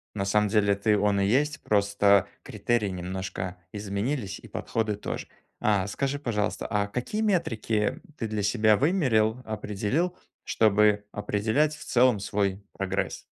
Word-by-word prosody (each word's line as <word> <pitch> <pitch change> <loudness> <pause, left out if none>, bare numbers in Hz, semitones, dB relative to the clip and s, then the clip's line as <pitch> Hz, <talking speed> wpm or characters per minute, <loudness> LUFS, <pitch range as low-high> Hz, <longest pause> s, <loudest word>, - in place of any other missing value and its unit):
На 100 - -1
самом 105 +1 +2
деле 100 -1 +3
это 100 +2 -2
и - - +5
он 100 -1 +2
и 100 - +2
есть, 140 +6 +1
просто 100 -1 +3 0.2
критерии 120 -3 0
немножко 95 0 -4 0.2
изменились, 105 +2 -3
и - - -13
подходы 110 -2 -2
тоже. 105 - -5 0.3
А 100 -3 +2
скажи, 140 +7 -2
пожалуйста, 105 -6 -2
а 105 -1 0
какие 125 - -3
метрики 115 - 0 0.2
ты 115 - -2
для 110 -1 -2
себя 110 0 +3
вымерил, 130 - +2
определил, 110 - -1 0.3
чтобы 105 -1 +3
определять 110 +9 0
в 150 - -11
целом 125 -3 +4
свой 100 0 -1
прогресс? 95 0 -3
105 Hz, 145 wpm, -27 LUFS, 100-120 Hz, 0.3 s, и